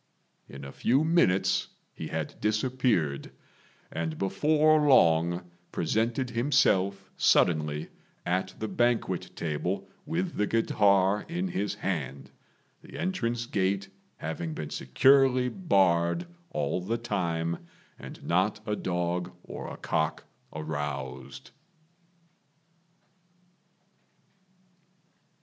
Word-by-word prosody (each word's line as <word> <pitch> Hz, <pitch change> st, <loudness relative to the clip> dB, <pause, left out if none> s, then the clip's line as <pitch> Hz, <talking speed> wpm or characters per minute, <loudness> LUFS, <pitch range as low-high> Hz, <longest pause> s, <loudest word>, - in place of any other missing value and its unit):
In 70 Hz, +1 st, -9 dB
a 70 Hz, -, -7 dB
few 130 Hz, -, +2 dB
minutes 95 Hz, -, +3 dB, 0.3 s
he -, -, -6 dB
had -, -, -3 dB
disappeared, 110 Hz, -, 0 dB, 0.6 s
and 80 Hz, -1 st, -3 dB
before 155 Hz, -, +3 dB
long 85 Hz, -, +4 dB, 0.2 s
presented 120 Hz, +3 st, 0 dB
himself 100 Hz, -6 st, +2 dB
suddenly 75 Hz, -3 st, +2 dB, 0.4 s
at 95 Hz, +1 st, -1 dB
the 110 Hz, -, -3 dB
banquet 120 Hz, +4 st, 0 dB
table 90 Hz, +5 st, -2 dB, 0.2 s
with 170 Hz, +3 st, -2 dB
the 105 Hz, -, +1 dB
guitar 100 Hz, -3 st, +3 dB
in 180 Hz, +3 st, -2 dB
his 100 Hz, -, -2 dB
hand, 75 Hz, -10 st, -4 dB, 0.5 s
the -, -, -11 dB
entrance 120 Hz, -11 st, -1 dB
gate 100 Hz, -2 st, 0 dB, 0.3 s
having 80 Hz, 0 st, -4 dB
been 75 Hz, -, -5 dB
securely 130 Hz, -, +4 dB
barred 95 Hz, -, +2 dB, 0.2 s
all 130 Hz, -, -1 dB
the 110 Hz, +6 st, -1 dB
time, 85 Hz, -7 st, -2 dB, 0.3 s
and -, -, -10 dB
not 95 Hz, +5 st, +1 dB
a 105 Hz, -, -1 dB
dog 90 Hz, -1 st, -2 dB
or -, -, -7 dB
a -, -, -8 dB
cock -, -, -1 dB, 0.3 s
aroused. 70 Hz, -4 st, -5 dB
95 Hz, 95 wpm, -28 LUFS, 85-120 Hz, 0.6 s, long